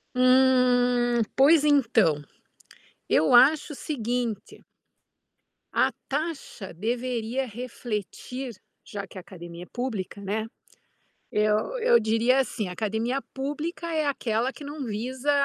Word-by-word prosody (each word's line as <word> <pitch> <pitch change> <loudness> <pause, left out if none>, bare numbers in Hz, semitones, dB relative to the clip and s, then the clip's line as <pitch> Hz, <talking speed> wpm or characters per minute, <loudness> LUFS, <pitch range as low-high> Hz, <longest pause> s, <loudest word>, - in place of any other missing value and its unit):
Hum, 250 -2 +4
pois 295 +3 +6
então. 230 - +3 0.9
Eu 160 - +3
acho 295 +5 +6
o - - -9
seguinte 240 -6 -3 1.1
a - - +3 0.2
taxa 285 - -4
deveria 240 +5 -2
refletir, 240 +2 -5 0.3
já 200 -1 -6
que 190 - -13
a - - -6
academia 175 -1 -10
é - - -14
pública, 220 -6 -4
né, 210 +3 -2 0.9
eu 215 - +1
eu 480 +1 +5
diria 225 +4 +2
assim, 225 -6 -1
a - - -5
academia 220 +7 -1
pública 295 +5 -4
é 310 -2 +1
aquela 245 -2 0
que 295 - -12
não 290 0 -6
visa 250 +5 -2
245 Hz, 115 wpm, -26 LUFS, 215-270 Hz, 1.1 s, pois